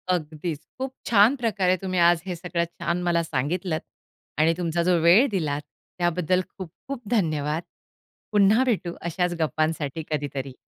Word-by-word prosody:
अगदीच, 155 -1 -4 0.2
खूप 265 0 -3
छान 225 +4 +5
प्रकारे 200 -7 +1
तुम्ही 185 0 -2
आज 170 -1 +5
हे 180 -2 -3
सगळं 170 0 -2
छान 170 +1 -3
मला 170 -1 +2
सांगितलंत 160 +4 -2 0.6
आणि 160 +2 +4
तुमचा 170 -1 0
जो 180 -1 +3
वेळ 180 - +6
दिलात 150 -6 -1 0.4
त्याबद्दल 175 +1 +1
खूप-खूप 205 - -8
धन्यवाद. 155 -6 0 0.7
पुन्हा 210 +4 +5
भेटू 180 -6 -1 0.2
अशाच 180 +1 0
गप्पांसाठी 155 0 -1
कधीतरी. 140 -2 -3
175 Hz, 135 wpm, -25 LUFS, 155-185 Hz, 0.7 s, वेळ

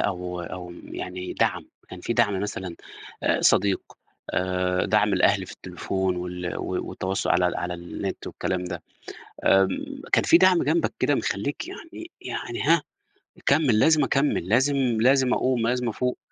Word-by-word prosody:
أو 90 -2 -2
أو 90 0 -7
يعني 90 0 -6
دَعْم، - - 0 0.2
كان 95 - -9
في 115 - -2
دَعْم 105 -5 +2
مثلًا، 95 -4 -4 0.5
آآ - - +2
صديق، 100 0 +3 0.5
آآ، 90 0 0
دَعْم 105 0 +3
الأهل - - +3
في - - -9
التليفون، 95 -1 -3
وال 90 0 -4
و - - -2
والتواصل 95 +1 -2
على 90 0 +3
على 90 0 -3
النت 85 0 -6
والكلام 90 -1 -3
ده، 90 -2 -5 0.6
آمم، 95 0 +2
كان - - +5
في 170 - +6
دَعْم 185 -1 +5
جنبَك 160 +4 +1
كده 145 - +2
مخلِّيك 135 - -2
يعني 340 -2 -10
يعني - - -4
هاه، - - +4 0.6
يكمل، 140 -6 +3
لازم 155 +4 +5
أكمّل، 135 - +1
لازم 130 +5 +3 0.3
لازم 130 0 +4
أقُوم، 125 -3 +1
لازم 125 -1 0
أفوق، 125 +3 -2
100 Hz, 150 wpm, -25 LUFS, 90-130 Hz, 0.6 s, في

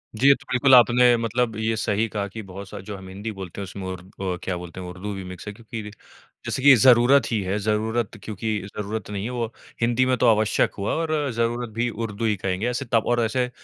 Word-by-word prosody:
जी, 130 +6 +3
ये 140 - +9
तो - - -17
बिल्कुल 130 +1 +6
आपने 120 0 +6
मतलब 115 0 -1
ये 110 0 0
सही 105 +1 0
कहा 100 -1 -3
कि 110 +3 -8
बहुत 95 0 -9
सा - - -7
जो 100 +2 -7
हम 95 -1 -11
हिंदी 100 +4 -5
बोलते 95 -1 -7
हैं - - -3
उसमें 95 0 -7
उर 95 -1 -5 0.4
अ, - - -9
क्या 95 - -2
बोलते 90 +1 -9
है 90 - -6
उर्दू 95 +3 -6
भी 95 -1 -6
मिक्स 90 +2 -9
है 105 - -5
क्योंकि 115 +1 -8
रे 105 - -8 0.6
जैसे 130 - -3
कि 140 -1 +9
ज़रूरत 125 +3 +5
ही 110 -3 +1
है, 95 +3 -1
ज़रूरत 110 +2 -1
क्योंकि 110 0 -3 0.2
ज़रूरत 105 0 -4
नहीं 100 -1 -3
है 120 - -3
वो 120 -2 -3 0.3
हिंदी 120 +2 +3
में 130 -1 +2
तो 125 - +3
आवश्यक 110 -1 +2
हुआ 100 - -1
और 155 -4 -1
ज़रूरत 115 0 -1
भी 120 +1 0
उर्दू 115 0 -4
ही 105 -2 +2
कहेंगे, 95 +4 -2
ऐसे 125 +2 -3
त - - +6
और 120 +2 +2
ऐसे 125 +2 0
110 Hz, 240 wpm, -24 LUFS, 100-120 Hz, 0.6 s, ये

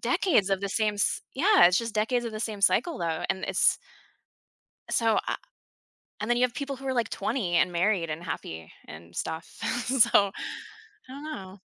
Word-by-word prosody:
decades 250 - +2
of 195 0 +1
the 200 - -2
same 210 +1 0
s 205 - 0
yeah, 380 - +6
it's 180 +2 +3
just 230 -2 -4
decades 240 +3 +1
of 230 - -4
the 215 - -5
same 215 -2 -3
cycle, 330 - +2
though, 165 -2 -2
and 190 - -2
it's - - +3 1.1
So, 225 -2 +2
I - - 0 0.9
and 210 - -3
then 240 - +3
you 250 - +3
have 250 -2 +1
people 275 -2 -4
who 270 0 -7
are, 265 - 0
like, 235 -3 0
20 210 -8 -1
and 175 +1 +2
married, 175 -2 +1
and 155 +3 -5
happy, 80 - -6 0.2
and 85 +2 -12
stuff, 160 - -4 0.4
so, 220 -6 +4 0.8
I - - -13
don't 275 +2 -8
know. 195 -11 -8
215 Hz, 190 wpm, -27 LUFS, 180-250 Hz, 1.1 s, yeah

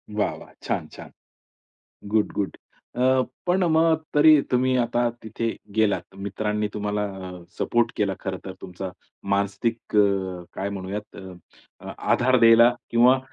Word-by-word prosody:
वाह, 105 - 0
वाह! - - -14
छान - - -2
छान. - - -11 1.0
Good 110 -1 +2
good. 100 -2 -2 0.4
अ, 130 +1 +3 0.3
पण 180 +1 +2
मग 160 0 +3
तरी 150 0 +7
तुम्ही 130 +1 +2
आता 120 0 +1
तिथे 110 +1 -3 0.3
गेलात, 105 -5 +2
मित्रांनी 105 +2 -2
तुम्हाला 105 0 -2 0.5
सपोर्ट 120 -1 +1
केला 100 -2 +1
खरंतर. 95 -1 -5
तुमचा 95 +1 -6 0.4
मानसिक 100 +3 0 0.8
काय 100 +1 -3
म्हणूयात 100 +2 -6 0.8
आधार 130 +1 +2
द्यायला 115 +1 +7 0.2
किंवा 125 +3 +5
110 Hz, 115 wpm, -24 LUFS, 100-125 Hz, 1.0 s, तरी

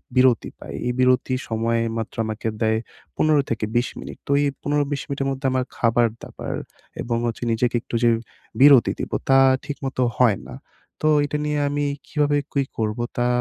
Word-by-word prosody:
বিরতি 125 -3 +4
পাই, - - -9
এই 125 - 0
বিরতি 130 0 +3 0.2
সময় 115 +1 0 0.2
মাত্র 110 -1 -5
আমাকে 110 +1 -4
দেয় 110 0 +2 0.4
১৫ 155 -2 +3
থেকে 115 -1 -1
২০ 120 +1 +2
মিনিট। - - -8
তো - - -1
এই 145 - +2
১৫-২০ 145 -1 0
মিনিটের 140 -1 -2
মধ্যে 135 +1 -5
আমার 130 -1 0
খাবার-দাবার 115 -1 0 0.5
এবং 120 -1 -1
হচ্ছে 120 +1 -3
নিজেকে 120 +2 +1
একটু - - -6
যে 120 - +6 0.5
বিরতি 140 -3 +7
দিবো - - -3
তা 135 - +7 0.3
ঠিকমতো 135 -2 -4 0.2
হয় 115 -6 +4
না। - - -8 0.5
তো - - +5 0.2
এটা 145 +1 -2
নিয়ে 150 0 0
আমি 145 0 -1 0.2
কিভাবে 145 -2 +1 0.2
কি 140 - +2
করবো 110 +1 -1
তা 120 0 +2
125 Hz, 170 wpm, -23 LUFS, 115-140 Hz, 0.5 s, বিরতি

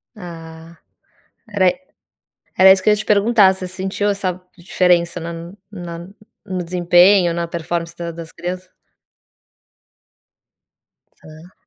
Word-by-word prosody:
Ah. 165 -3 -11 0.7
Era 200 -3 +2
i - - -7 0.8
era 190 0 +8
isso 190 - +4
que 185 - -10
eu - - +6
ia 210 - 0
te 215 - -3
perguntar, 205 -1 +4
você 185 -1 -6
sentiu 190 +2 -3
essa 185 -2 -2 0.2
diferença 175 -1 +1
na 170 +1 -7 0.2
na 175 -3 -8 0.4
no 185 -2 -4
desempenho, 175 +1 +4
na 170 0 -3
performance 170 0 -4
da 170 -1 -5
das 165 0 -10
criança? 180 +1 -6 2.5
Tá. 155 +4 -15
180 Hz, 125 wpm, -19 LUFS, 170-190 Hz, 2.5 s, era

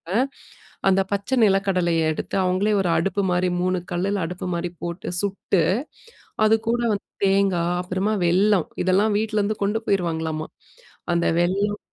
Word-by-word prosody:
அ - - +4 0.7
அந்த 195 0 +4
பச்ச 200 +2 -2
நிலக்கடலைய 190 -4 +2
எடுத்து, - - -4
அவுங்களே 185 +4 +1
ஒரு 180 - 0
அடுப்பு 200 +1 0
மாரி 180 0 +1
3 185 0 +1
கல்லுல 190 +2 -1
அடுப்பு 180 +2 -5
மாரி 170 +1 -2
போட்டு 175 +2 -5
சுட்டு, 195 -2 0 0.8
அதுக்கூட 225 +2 +2
வந்து 200 - -5 0.2
தேங்காய் 185 -3 +2
அப்புறமா 185 +4 -1
வெல்லம் 185 +1 +3 0.2
இதெல்லாம் 200 +3 +2
வீட்லேருந்து 215 -1 0
கொண்டு 210 +3 0
போயிடுவாங்களாமா. 160 -4 -1 0.7
அந்த 170 0 +1
வெல்லம் 200 +4 0
190 Hz, 130 wpm, -23 LUFS, 175-205 Hz, 0.8 s, அ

